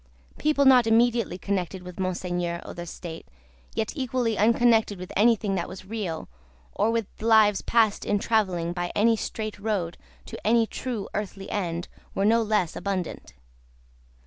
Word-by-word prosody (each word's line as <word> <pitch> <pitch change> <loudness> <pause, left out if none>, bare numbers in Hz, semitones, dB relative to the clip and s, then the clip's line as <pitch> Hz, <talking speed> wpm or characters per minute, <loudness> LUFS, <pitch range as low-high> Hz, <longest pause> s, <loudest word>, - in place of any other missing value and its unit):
People 295 -2 +2
not 250 -3 +7
immediately 230 -4 +3
connected 185 -1 -3
with 180 0 -10
Monseigneur 175 -2 -2
or - - -7
the 175 0 -7
State, 165 0 -8 0.5
yet 220 +4 -2
equally 255 -4 0
unconnected 225 -1 +3
with 180 0 -8
anything 215 -2 +3
that 180 -3 -2
was 185 0 -9
real, 190 -6 -4 0.5
or 215 - +1
with 230 -1 0 0.2
lives 220 -2 +5
passed 225 -3 +2
in 205 - +1
travelling 185 -6 0
by 175 0 -3
any 225 +2 +4
straight 215 -1 -5
road 200 -5 -2 0.3
to - - -8
any 230 +1 +4
true 225 -3 -4
earthly 195 -1 -5
end, 175 -4 -2 0.3
were 195 - +1
no 230 +2 +4
less 210 -6 0
abundant. 190 - -4
205 Hz, 150 wpm, -26 LUFS, 180-225 Hz, 0.5 s, not